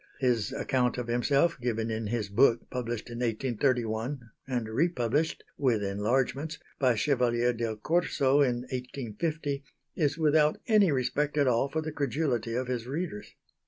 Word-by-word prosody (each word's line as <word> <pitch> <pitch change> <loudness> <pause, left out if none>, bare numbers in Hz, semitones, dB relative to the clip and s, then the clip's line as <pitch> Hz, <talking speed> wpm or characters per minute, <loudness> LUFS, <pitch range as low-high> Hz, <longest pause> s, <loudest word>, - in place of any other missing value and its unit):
His 120 -5 +1
account 125 -2 0
of 125 - -2
himself, 140 +5 +2
given 115 -2 -1
in 110 -1 -2
his 110 -1 -1
book 115 +2 +3
published 120 -2 -4
in 120 - -6
1831, 120 0 -1 0.2
and 125 -4 -2
republished 145 +3 0 0.2
with 120 -7 +2
enlargements, 125 +10 0 0.2
by 130 -3 +3
Chevalier 120 -1 +2
del 115 -1 -2
Corso 140 +1 +2
in 125 -3 +2
1850, 140 +4 -3 0.3
is 150 -2 +1
without 155 -1 +3
any 210 -6 +4
respect 140 +3 0
at 145 - +4
all 125 +2 +2
for 160 +2 -1
the 155 - -4
credulity 130 -5 -1
of 130 +1 -1
his 125 -2 -3
readers. 145 -6 -5
125 Hz, 145 wpm, -29 LUFS, 115-145 Hz, 0.3 s, any